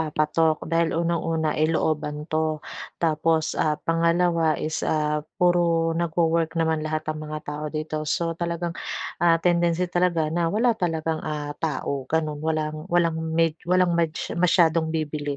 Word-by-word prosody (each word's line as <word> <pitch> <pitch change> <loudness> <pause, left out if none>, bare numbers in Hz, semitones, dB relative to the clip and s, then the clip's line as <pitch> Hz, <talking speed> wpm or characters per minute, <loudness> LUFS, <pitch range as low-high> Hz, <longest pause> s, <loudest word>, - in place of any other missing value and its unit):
papatok 155 +1 +1 0.2
dahil 165 0 +3
unang-una 165 -2 0
ay 155 - +4
looban 150 -2 0
'to. 160 0 +1 0.6
Tapos, 160 0 +2 0.2
ah, 150 -1 +1
pangalawa 170 0 +2 0.2
is, 155 - -2 0.2
ah, 150 0 0 0.2
puro 175 -1 +3 0.3
nagwo-work 165 -1 +1
naman 160 -1 +1
lahat 155 0 -2
ang 155 0 -3
mga 155 0 -4
tao 150 +1 -4
dito. 155 0 -3 0.2
So 170 - -1 0.2
talagang, 170 0 -2 0.5
ah, 165 -1 +6
tendency 175 0 +2
talaga 175 -2 +2
na 170 - +2
wala 235 +3 +3
talagang, 160 -2 -1
ah, 145 -1 -4
tao, 145 -2 -2 0.2
gano'n. 155 -2 0
Walang 155 -1 -1 0.2
walang 170 -2 +3 0.2
med 165 -2 +3 0.2
walang 180 -1 +4
mads 160 -2 0 0.2
masyadong 165 -2 +3
bibili, 150 -2 -2
160 Hz, 145 wpm, -24 LUFS, 155-170 Hz, 0.6 s, ah